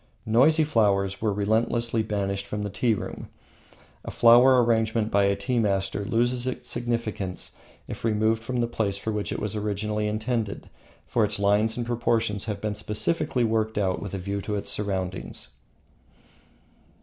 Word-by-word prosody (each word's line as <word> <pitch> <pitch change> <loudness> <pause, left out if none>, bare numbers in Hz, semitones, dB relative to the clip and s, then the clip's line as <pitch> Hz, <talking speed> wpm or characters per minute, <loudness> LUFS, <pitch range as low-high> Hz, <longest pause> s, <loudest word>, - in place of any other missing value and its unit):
"Noisy" 140 +9 +4
flowers 100 -8 +1
were 110 -1 +1
relentlessly 115 +3 +1
banished 100 -2 -2
from 105 0 -3
the 105 - -4
tea 115 +2 +1
room. - - -7 0.8
A - - -6
flower 125 +2 +6
arrangement 110 -1 +1
by 100 0 +4
a 100 0 +2
tea 125 +2 -1
master 100 -1 0
loses 120 +3 0
its 125 -1 -4
significance 115 -6 -2 0.3
if - - -7
removed 110 0 +1
from 120 +2 -2
the 120 - +1
place 105 -4 -1
for 110 +2 -3
which 105 -1 -3
it - - -2
was 105 0 -3
originally 105 0 -2
intended, 110 0 -3 0.3
for 115 - +1
its 105 - 0
lines 105 +3 +2
and 120 - -2
proportions 115 -3 0
have 105 -3 -3
been 105 0 -2
specially 110 +5 -1
worked 110 -1 0
out 95 -3 0
with 100 -2 -5
a - - -2
view 100 +2 -3
to 105 +1 -3
its 100 - -2
surroundings. 95 -3 -3
110 Hz, 160 wpm, -26 LUFS, 100-115 Hz, 0.8 s, flower